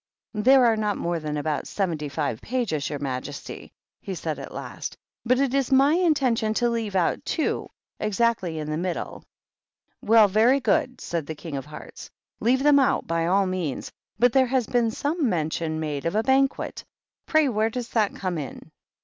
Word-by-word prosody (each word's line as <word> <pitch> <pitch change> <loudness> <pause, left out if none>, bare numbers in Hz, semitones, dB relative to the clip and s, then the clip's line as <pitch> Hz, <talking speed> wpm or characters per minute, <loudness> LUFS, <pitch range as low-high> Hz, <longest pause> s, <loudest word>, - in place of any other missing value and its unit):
"There 250 +4 +5
are 230 -1 +4
not 210 -2 -1
more 170 0 -1
than 150 -1 -3
about 150 -1 -2
seventy 165 -7 -2
five 120 -5 -2
pages, 220 - -2
your 145 - -3
majesty," 140 0 -6 0.3
he - - -5
said, - - -4
at - - -8
last, - - -6
" - - -69
but 255 +1 +4
it 275 -2 +1
is 275 -1 +1
my 275 +3 +5
intention 270 -11 +2
to 240 +1 +2
leave 225 -4 -2
out 180 -3 +1
two, 320 - -1 0.3
exactly 210 -5 0
in 155 0 -4
the 155 - -1
middle." 175 0 -4 0.8
"Well, 220 0 +6
very 225 +7 +4
good," 275 -1 +1
said 165 -4 -3
the 160 - -5
King 155 -1 -7
of 135 +1 -5
Hearts. 150 - -10 0.3
"Leave 260 +3 +2
them 290 -1 +6
out, 265 - +2
by 165 0 0
all 195 +2 +3
means. 185 -7 -3 0.3
But 245 0 +4
there 265 -1 +4
has 255 -1 +1
been 235 0 +1
some 290 +4 -1
mention 160 -2 -1
made 150 -1 -3
of 170 - -2
a 220 - +2
Banquet; 270 +1 +1 0.4
pray 310 -2 +4
where 220 -3 +1
does 240 +1 -5
that 215 -3 +1
come 180 -4 -3
in?" 140 -4 -8
215 Hz, 185 wpm, -25 LUFS, 160-255 Hz, 0.8 s, Well